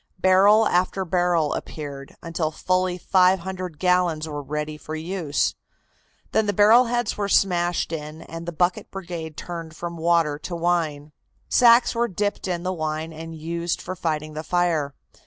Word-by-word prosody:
Barrel 195 +4 +5
after 185 +2 +1
barrel 175 -3 +1
appeared, 140 -3 -7
until 165 -2 -2
fully 185 +3 0
five 185 0 +3
hundred 185 -3 -6
gallons 180 -3 +1
were 145 -1 -5
ready 150 +2 -4
for 155 +1 -7
use. 160 -2 -1 0.8
Then 220 -1 +2
the 205 - +1
barrel 220 +5 +6
heads 240 -1 -1
were 200 -1 -1
smashed 175 -4 +2
in 155 0 -6
and 165 +1 -8
the - - -2
bucket 175 +2 0
brigade 170 -5 -7
turned 165 -2 -7
from 170 +1 -6
water 165 -3 +2
to 175 - -5
wine. 165 -4 -1 0.4
Sacks 240 0 +6
were 235 0 +1
dipped 205 0 -2
in 175 -2 -2
the 185 0 -1
wine 155 -1 -3
and 165 +1 -8
used 170 +2 -3
for 185 - -6
fighting 155 -3 -3
the 155 - -4
fire. 160 -5 0
170 Hz, 160 wpm, -24 LUFS, 155-185 Hz, 0.8 s, barrel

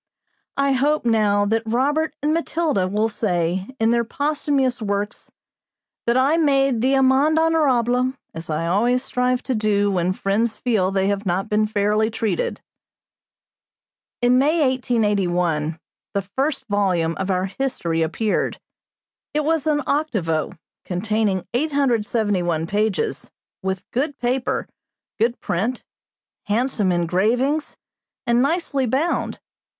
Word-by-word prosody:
I 275 0 +2
hope, 285 +2 +1
now, 210 -3 +3
that 225 +2 +1
Robert 290 +8 0
and 300 +1 +2
Matilda 320 - 0
will 210 +3 +1
say, 185 -3 -1
in 225 +1 +3
their 235 0 +2
posthumous 280 -1 0
works, 205 0 -3 0.8
that 235 +1 +3
I 275 +5 +3
made 275 -6 +2
the 265 +2 +3
amende 270 +4 +4
honorable, 260 -6 +2 0.2
as 165 0 -7
I 155 +1 -1
always 235 +8 +2
strive 250 -1 0
to 260 - -1
do 205 -2 +1
when 180 -1 +1
friends 215 +4 0
feel 215 -7 +1
they 195 0 0
have 200 0 -2
not 185 +2 -1
been 215 0 +2
fairly 210 +1 +1
treated. 230 - -2 1.6
In 250 +1 +5
May, 310 +4 +2
1881, 180 -10 0 0.4
the 200 - 0
first 265 +8 -2
volume 190 -6 +1
of 190 0 -2
our 185 0 +1
History 190 -7 -2
appeared; 170 +7 -1 0.8
it 300 - +2
was 320 -1 +1
an 295 -1 +1
octavo, 205 - -1 0.3
containing 200 0 -1
871 220 - 0
pages, 205 +2 -1 0.3
with 190 0 -3
good 280 +3 -1
paper, 250 +1 -1 0.5
good 235 +2 +1
print, 220 +9 -2 0.6
handsome 215 -2 +1
engravings, 220 - 0 0.5
and 240 0 +3
nicely 280 -3 0
bound. 280 +9 -1
225 Hz, 125 wpm, -22 LUFS, 195-270 Hz, 1.6 s, In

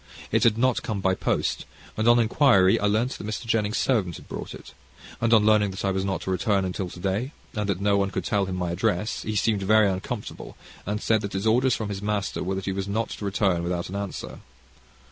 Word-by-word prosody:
It - - +2
had 110 -2 +4
not 130 +1 +2
come 110 -4 -3
by 95 0 +2
post, - - -1 0.3
and, 110 +1 0
on 120 0 +7
inquiry, 115 -5 +4
I 105 - +1
learned 110 +5 +1
that - - -7
Mr. 110 +2 -4
Jennings' 110 -1 0
servant 100 - +1
had - - -12
brought - - -6
it, - - -13 0.5
and 115 0 +2
on 110 -2 +5
learning 105 -1 +4
that 95 +1 -5
I 95 - +2
was 95 0 -1
not 95 -2 -2
to 95 - -3
return 95 +1 +1
until 90 0 -3
to 90 - -11
day, 100 - -2 0.2
and 105 -1 -2
that 95 -2 0
no 100 0 +2
one 100 0 +1
could - - -3
tell 100 -5 +1
him 95 -1 -4
my 90 -1 -2
address, 105 +2 -1
he 110 - -4
seemed 105 0 +1
very 110 +2 +4
uncomfortable, 100 +4 -5 0.3
and 105 +1 -2
said 110 -2 +2
his 95 +2 -3
orders 125 +3 +3
from 110 -2 -4
his 100 -1 -4
master 105 -1 -2
were 95 +1 -2
that 95 - -3
that - - -9
he 95 - -1
was 95 0 -3
not 110 +2 -1
to 105 - -6
return 95 -3 +1
without 85 0 -3
an 95 - -6
answer. 100 -1 -5
100 Hz, 240 wpm, -25 LUFS, 95-110 Hz, 0.5 s, on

